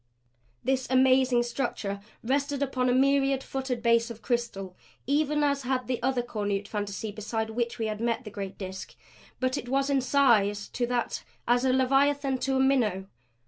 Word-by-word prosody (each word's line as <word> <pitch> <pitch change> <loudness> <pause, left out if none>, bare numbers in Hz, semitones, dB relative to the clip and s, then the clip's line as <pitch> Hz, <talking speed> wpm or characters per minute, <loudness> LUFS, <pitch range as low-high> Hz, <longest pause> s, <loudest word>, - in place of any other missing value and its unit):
This 260 0 0
amazing 260 -1 +4
structure 235 -5 -3 0.2
rested 280 +3 0
upon 255 -2 0
a - - +3
myriad 270 +1 +3
footed 265 -3 -3
base 230 0 +3
of 230 -1 -9
crystal, 200 -7 -2 0.3
even 295 +1 +1
as 280 -1 +1
had 255 -1 -1
that 250 -2 -1
other 255 -1 +1
cornute 205 -3 -2
fantasy 205 +1 -4
beside 220 +1 -3
which 235 +1 -2
we 225 - -2
had 215 0 -3
met 235 +1 0
the 210 - -8
great 195 -1 -6
Disk. 190 -1 -7 0.4
But 255 +2 0
it 245 -2 -8
was 275 +1 +1
in 275 -1 +3
size 230 -7 +3
to 245 -1 -2
that 245 -1 -2 0.2
as 245 +2 +3
as - - +4
Leviathan 270 +1 +2
to 270 +1 0
a - - +2
minnow. 240 -8 +2
250 Hz, 175 wpm, -28 LUFS, 220-270 Hz, 0.4 s, amazing